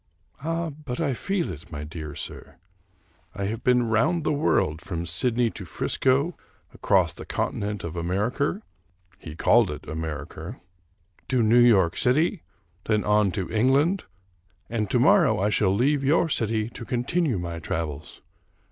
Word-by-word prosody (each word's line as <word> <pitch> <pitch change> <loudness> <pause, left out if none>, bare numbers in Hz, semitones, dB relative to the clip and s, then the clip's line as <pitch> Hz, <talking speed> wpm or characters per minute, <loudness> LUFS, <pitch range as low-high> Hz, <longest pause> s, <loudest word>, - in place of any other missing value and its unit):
" - - -24
Ah, 165 0 -2
but 145 -3 -7
I 150 -5 0
feel 195 +6 -2
it, 80 -2 -11
my 75 -1 -5
dear 75 -1 -7
sir. - - -9 0.8
I 100 - -3
have 110 +3 -4
been 125 -1 +4
round 150 +10 +2
the - - +1
world, 80 - +1
from 85 -2 -4
Sydney 115 +7 +1
to 100 - -8
Frisco, 135 - 0 0.4
across - - +2
the - - -9
continent 105 -1 -3
of 85 0 -5
America" 105 - -1 0.6
(he 75 -2 -9
called 115 +4 +4
it 75 - -6
Amerrker) 80 - -6 0.7
"to 125 -3 +2
New 115 +3 +5
York 100 -8 +5
City, 155 +8 +2 0.4
then 105 -1 +1
on 105 -1 +3
to 95 - -3
England, 135 - +2 0.7
and 110 -4 -1
to - - +2
morrow - - +4
I 105 +2 +1
shall 105 -2 +3
leave 135 +8 +2
your 160 +4 +3
city 110 -5 0
to 120 - -8
continue 125 - 0
my 85 -1 -4
travels. 80 -2 -5
110 Hz, 155 wpm, -25 LUFS, 85-140 Hz, 0.8 s, New